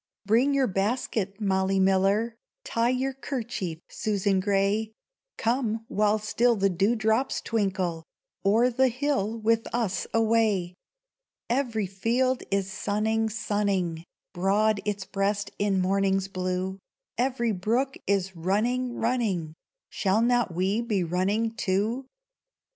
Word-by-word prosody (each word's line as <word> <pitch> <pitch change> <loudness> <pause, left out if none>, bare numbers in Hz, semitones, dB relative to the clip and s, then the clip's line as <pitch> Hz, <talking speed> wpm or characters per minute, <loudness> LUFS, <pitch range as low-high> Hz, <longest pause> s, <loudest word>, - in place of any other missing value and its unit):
BRING 245 +7 +3
your 275 -1 +3
basket, 200 -1 -1
Molly 190 -1 +1
Miller, 195 +4 +2 0.3
Tie 235 - +1
your 260 +1 0
kerchief, 235 - -4
Susan 200 -2 0
Gray! 200 +3 +1 0.4
Come, 225 -2 0
while 210 +1 +2
still 235 +3 +2
the 195 -2 +2
dewdrops 220 +6 +1
twinkle, 190 -7 -1 0.4
O'er 225 +5 +4
the 260 +2 +3
hill 250 -4 -1
with 225 +1 +1
us 225 -6 -1
away. 220 -5 +2 0.8
Every 235 -5 0
field 235 +7 0
is 195 -1 -1
sunning, 220 +2 0
sunning 200 -6 -1 0.3
Broad 200 +3 +2
its 205 -2 -2
breast 200 +1 -1
in 200 -2 +2
morning's 195 +1 +1
blue; 185 0 -3 0.4
Every 245 -2 +1
brook 235 +8 0
is 195 -2 0
running, 235 +8 0
running, 215 -10 -1 0.4
Shall 200 +3 +1
not 240 -4 +2
we 190 +6 0
be 210 -6 0
running, 195 +6 0
too? 225 +5 -1
210 Hz, 115 wpm, -27 LUFS, 195-230 Hz, 0.8 s, O'er